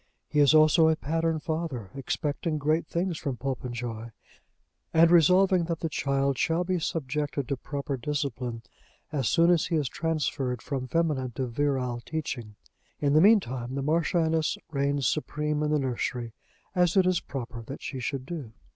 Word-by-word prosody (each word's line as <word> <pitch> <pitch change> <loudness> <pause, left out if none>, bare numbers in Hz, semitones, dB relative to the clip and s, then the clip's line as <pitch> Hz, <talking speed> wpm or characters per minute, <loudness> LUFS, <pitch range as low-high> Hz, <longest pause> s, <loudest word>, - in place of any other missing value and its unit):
He 150 - 0
is 145 +1 +6
also 155 +1 +6
a 160 - +3
pattern 165 +2 -1
father, 155 - -4
expecting 150 +4 -2
great 155 +3 +1
things 170 -1 -2
from 135 -5 -3
Popenjoy, 120 -3 -4 0.9
and 165 +1 +6
resolving 180 +2 +5
that 165 -1 -3
the 165 - -1
child 140 -2 0
shall 165 +2 +1
be 180 0 -1
subjected 145 -3 -2
to 140 - -1
proper 140 +1 -4
discipline 125 -3 -3 0.5
as 135 -6 0
soon 170 +1 +4
as 170 -3 +2
he 170 - 0
is 150 -4 +1
transferred 145 -6 -1
from 130 -2 -3
feminine 145 -6 0
to 130 +2 -2
virile 125 -1 -1
teaching. 130 -9 -5 0.4
In 140 -1 +2
the 155 - +6
meantime 130 - +3
the 140 - -2
Marchioness 160 +1 +1
reigns 140 -1 0
supreme 150 +2 -1
in 150 - 0
the 150 - +3
nursery, 125 -3 -2 0.4
as 180 0 +2
it 190 - +5
is 185 -2 +2
proper 120 -3 -6
that 130 +5 -9
she 135 - -4
should 130 +1 -3
do. 145 -8 -6
145 Hz, 165 wpm, -27 LUFS, 130-160 Hz, 0.9 s, is